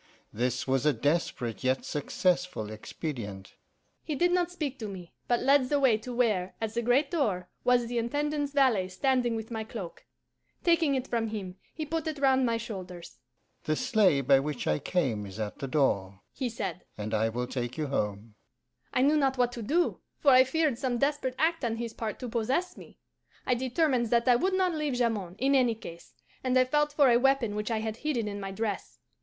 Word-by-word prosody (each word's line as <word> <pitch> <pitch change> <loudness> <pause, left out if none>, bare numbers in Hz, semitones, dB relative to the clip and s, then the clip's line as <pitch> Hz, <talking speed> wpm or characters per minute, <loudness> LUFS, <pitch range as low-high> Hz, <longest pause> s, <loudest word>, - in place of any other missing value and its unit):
This 125 +3 -1
was 135 -1 +1
a 150 - +4
desperate 125 -3 -1
yet 130 +1 +1
successful 175 - -1
expedient.' 110 - -6 0.5
"He 305 - -3
did 350 +5 +2
not 355 -1 +2
speak 300 -7 -4
to 220 - -4
me, 185 -4 -9
but 240 -1 +2
led 270 -2 +4
the 290 - +2
way 260 -5 +5
to 250 +3 -7
where, 215 -7 0
at 220 -1 -3
the 235 - 0
great 250 +6 +2
door, 205 - 0
was 245 -1 +3
the 240 0 -2
Intendant's 290 +4 -1
valet 255 -10 +3
standing 245 +4 +1
with 220 +1 -6
my 220 -1 -3
cloak. 210 -6 -8 0.6
Taking 330 -5 +3
it 260 -1 -1
from 230 -2 -1
him, 195 -4 -6 0.2
he 315 - -3
put 320 +1 -3
it 310 -1 -3
round 265 -2 +3
my 230 0 +1
shoulders. 185 - -8 0.4
'The 155 - 0
sleigh 210 - +3
by 135 +1 +5
which 145 -2 -3
I 75 - +1
came 125 - -1
is 95 +2 -9
at 105 -1 -4
the 135 - -3
door,' 100 -9 0
he 255 -3 -2
said, 195 -6 -5
'and 105 +1 -4
I 110 +1 +2
will 125 +2 -2
take 125 -1 -4
you 155 - -1
home.' 105 -5 -3 0.6
I 255 - +2
knew 295 +3 +4
not 270 -2 +2
what 245 -1 +2
to 240 - -6
do, 330 +11 +1 0.2
for 285 - +4
I 255 0 +8
feared 290 -2 0
some 255 -3 0
desperate 275 -1 0
act 325 +1 +1
on 230 -2 0
his 230 -1 -5
part 220 -2 -4
to 250 - -4
possess 260 +11 -1
me. - - -14 0.5
I 255 - +2
determined 255 0 +1
that 235 +2 +2
I 250 - +7
would 375 +10 +1
not 370 -2 +2
leave 300 -4 -1
Jamond, 220 -7 -1
in 270 +4 +2
any 250 -4 +3
case, 170 -6 -11 0.3
and 255 0 +2
I 255 - +5
felt 295 +3 +1
for 285 -3 +4
a 235 - +6
weapon 270 -4 +2
which 210 +1 -3
I 225 -2 0
had 220 0 -3
hidden 245 -7 -1
in 205 0 -4
my 195 -1 -5
dress. 205 +1 -4
230 Hz, 205 wpm, -29 LUFS, 175-270 Hz, 0.6 s, I